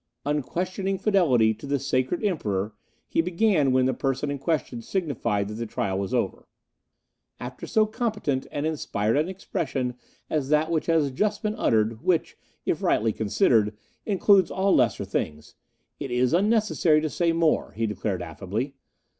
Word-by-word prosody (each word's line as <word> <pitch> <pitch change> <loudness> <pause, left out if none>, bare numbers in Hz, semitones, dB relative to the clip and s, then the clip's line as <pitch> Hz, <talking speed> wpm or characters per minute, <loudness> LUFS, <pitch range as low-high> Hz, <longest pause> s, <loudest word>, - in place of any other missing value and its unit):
'Unquestioning 180 +7 -1
Fidelity 160 - +3
to 125 - -10
the 140 0 +1
Sacred 135 - -1
Emperor 105 - -1 0.2
' - - -42
he - - +4
began, 175 -5 +2
when 130 0 +3
the 130 - +2
person 135 +1 -1
in 140 - -4
question 135 -6 -1
signified 115 - -1
that 105 - -6
the 115 +1 -4
trial 95 -2 -2
was 100 -1 -3
over. - - -1 0.9
"'After - - -7
so 215 -1 +3
competent 210 - -2
and 145 +1 -2
inspired 115 -8 -1
an 155 +5 +1
expression 135 -9 -3 0.3
as 145 -3 -1
that 155 +2 +2
which 160 -2 0
has 160 -4 +2
just 205 +10 -1
been 215 0 0
uttered, 110 - +1
which, 175 0 +1 0.3
if - - 0
rightly 110 0 +2
considered, 110 - +2 0.3
includes 195 -2 +4
all 190 +1 +1
lesser 125 -4 +2
things, 75 0 -4 0.5
it - - -4
is 125 +1 +1
unnecessary 205 -5 +3
to 155 - -1
say 170 +2 +1
more,' 165 -1 +1
he 115 +1 -1
declared 105 -2 -2
affably. 100 - -4
145 Hz, 160 wpm, -26 LUFS, 115-180 Hz, 0.9 s, he